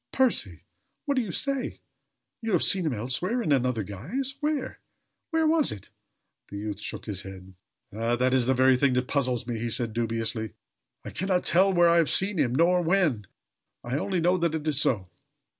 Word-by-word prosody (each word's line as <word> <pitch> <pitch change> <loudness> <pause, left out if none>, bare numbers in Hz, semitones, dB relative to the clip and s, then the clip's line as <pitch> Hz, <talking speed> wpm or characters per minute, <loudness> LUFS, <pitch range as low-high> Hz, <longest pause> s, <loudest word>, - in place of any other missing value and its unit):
"Percy! 260 -2 0 0.4
What 285 - +1
do 260 - +1
you 220 - -5
say? 275 +5 -2 0.6
You 225 -2 -2
have 175 - +3
seen 185 -4 +3
him 145 - 0
elsewhere 130 - -2
in 155 - -1
another 125 -5 +1
guise? 170 - -4
Where? 295 -3 -2 0.5
Where 320 -1 +1
was 315 -1 +3
it?" 100 - -10 0.6
The 100 - -7
youth 105 -1 -5
shook 105 -3 -6
his 100 -3 -3
head. 95 -1 -11 0.4
"Ah! 115 +3 0
that 125 +1 +1
is 125 -2 +2
the 130 - +3
very 130 0 +4
thing 135 0 +2
that 125 0 0
puzzles 125 -4 0
me," 120 -2 -4
he 120 +1 -2
said, 115 -1 0
dubiously. 115 -1 -2 0.5
"I - - -6
can 190 - -3
not 180 -2 +1
tell 190 +3 +4
where 175 -2 +4
I 170 0 +4
have 165 -3 +3
seen 190 -2 +2
him, 125 -4 +1
nor 175 +4 +3
when. 165 - +1 0.6
I 125 +4 -2
only 185 +1 -1
know 180 +2 +2
that 170 -1 0
it 155 -1 -4
is 150 -2 +2
so." 95 -11 0
140 Hz, 200 wpm, -26 LUFS, 115-185 Hz, 0.6 s, very